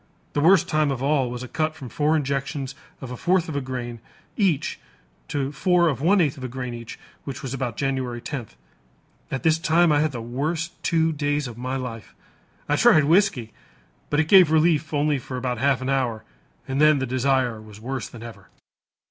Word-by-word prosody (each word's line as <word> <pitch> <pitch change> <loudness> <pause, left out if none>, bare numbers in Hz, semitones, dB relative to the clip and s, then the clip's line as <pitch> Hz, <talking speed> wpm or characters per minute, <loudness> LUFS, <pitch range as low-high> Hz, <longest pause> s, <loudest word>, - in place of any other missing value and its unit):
The 145 - 0
worst 180 +2 +5
time 155 -3 +1
of 135 -2 -3
all 140 -3 +2
was 125 +1 -5
a - - -6
cut 155 +4 -1
from 140 -5 -9
four 150 +5 +1
injections 140 -2 -2 0.3
of 130 -2 -7
a - - -4
fourth 175 +5 +1
of 155 - -5
a 140 - 0
grain 125 -3 -5 0.4
each 185 -9 0 0.5
to 140 -1 -2
four 175 +4 +3
of 135 -3 -3
one 195 +6 +4
eighth 155 -4 +1
of 130 - -9
a - - -2
grain 125 0 -5
each, 115 -1 -8 0.3
which 135 0 -7
was 130 -1 -4
about 125 -4 -3
January 130 -3 -2
10th. 120 - -6 0.7
At 135 - -4
this 160 0 +3
time 165 +1 +3
I 145 - +4
had 155 0 +1
the 120 - -5
worst 150 +8 -3
two 165 -1 +2
days 145 -2 -1
of 120 - -8
my 130 +3 -4
life. 115 -5 -6 0.5
I - - +1
tried 155 - +6
whiskey, 155 - +2 0.6
but 145 - +1
it 160 - +2
gave 185 -3 +7
relief 160 -1 +2
only 145 -1 +1
for 130 +1 -6
about 125 -2 -2
half 135 0 +2
an 130 - -2
hour 125 -5 0 0.4
and 135 +2 -1
then 150 -1 +6
the 130 - -1
desire 130 -2 0
was 105 -1 -13
worse 130 +2 -4
than 115 -1 -11
ever." 105 -5 -11
135 Hz, 205 wpm, -24 LUFS, 125-155 Hz, 0.7 s, gave